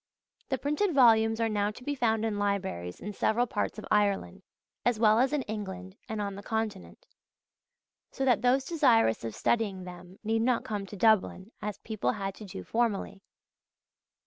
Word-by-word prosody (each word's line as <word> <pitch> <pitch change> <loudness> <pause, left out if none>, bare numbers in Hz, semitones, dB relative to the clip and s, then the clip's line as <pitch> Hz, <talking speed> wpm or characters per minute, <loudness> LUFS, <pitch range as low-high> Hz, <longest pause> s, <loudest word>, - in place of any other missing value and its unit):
The 265 - 0
printed 300 - 0
volumes 225 -3 +5
are 230 - +2
now 205 -1 0
to 215 +4 -10
be 290 - -2
found 225 -4 +1
in 210 -2 -1
libraries 190 - -2
in 210 - -6
several 225 +5 +1
parts 225 - -2
of 215 - -7
Ireland, 200 - +1 0.4
as 240 -3 +1
well 215 0 +5
as 260 +2 +3
in 295 -3 0
England 190 -4 -6
and 220 -1 -3
on 200 -1 -2
the 200 - -8
Continent; 210 - -4 1.0
so 270 - -3
that 250 -4 +3
those 255 +2 +3
desirous 245 - +3
of 115 -2 -5
studying 205 -5 0
them 180 +1 -11
need 225 +1 +1
not 245 0 +1
come 205 -2 -4
to 205 - -9
Dublin, 215 -1 +2
as 210 -1 -4
people 215 - -2
had 195 -1 -4
to 210 - -11
do 135 - -8
formerly. 210 - -1
215 Hz, 175 wpm, -29 LUFS, 195-235 Hz, 1.0 s, volumes